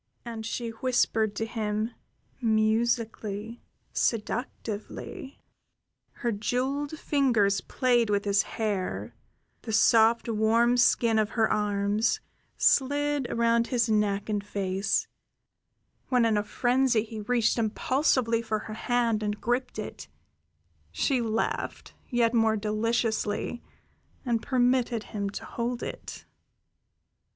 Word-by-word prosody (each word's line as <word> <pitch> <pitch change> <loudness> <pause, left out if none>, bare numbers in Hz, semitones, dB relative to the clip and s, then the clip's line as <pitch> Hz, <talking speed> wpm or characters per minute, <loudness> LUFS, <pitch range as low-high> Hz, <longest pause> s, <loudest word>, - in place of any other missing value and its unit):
And 225 -2 -5
she 235 0 -3
whispered 225 -3 +1
to 225 - -1
him 215 0 -2 0.5
musically, 225 -1 0 0.3
seductively; 240 - -3 0.8
her 240 - -2
jeweled 265 +8 -2
fingers 230 -11 +2
played 240 -1 +1
with 205 0 +1
his 200 0 +3
hair; 205 -4 -3 0.5
the 225 - -6
soft, 225 +1 +4
warm 230 +2 +3
skin 235 -2 +3
of 215 -1 +1
her 220 -1 +4
arms 205 +1 +1 0.4
slid 285 0 +2
over 235 0 +2
his 240 0 0
neck 205 -2 +1
and 210 -2 -1
face; 195 -1 -1 1.0
when, 250 -3 +3
in 225 -1 +2
a 205 - +1
frenzy, 245 0 +2
he 220 -1 -7
reached 235 +2 +1
impulsively 230 +1 +1
for 220 -2 -1
her 215 +1 -7
hand 230 -1 0
and 210 0 -2
gripped 245 +2 -1
it, - - -6 0.8
she 265 -4 +1
laughed 225 -1 -2 0.2
yet 240 -2 +2
more 225 -2 +3
deliciously 220 +1 -1 0.6
and 235 -2 +1
permitted 245 -3 +1
him 200 -2 -2
to 200 - -7
hold 240 +1 -3
it. - - -7
225 Hz, 110 wpm, -27 LUFS, 215-245 Hz, 1.0 s, soft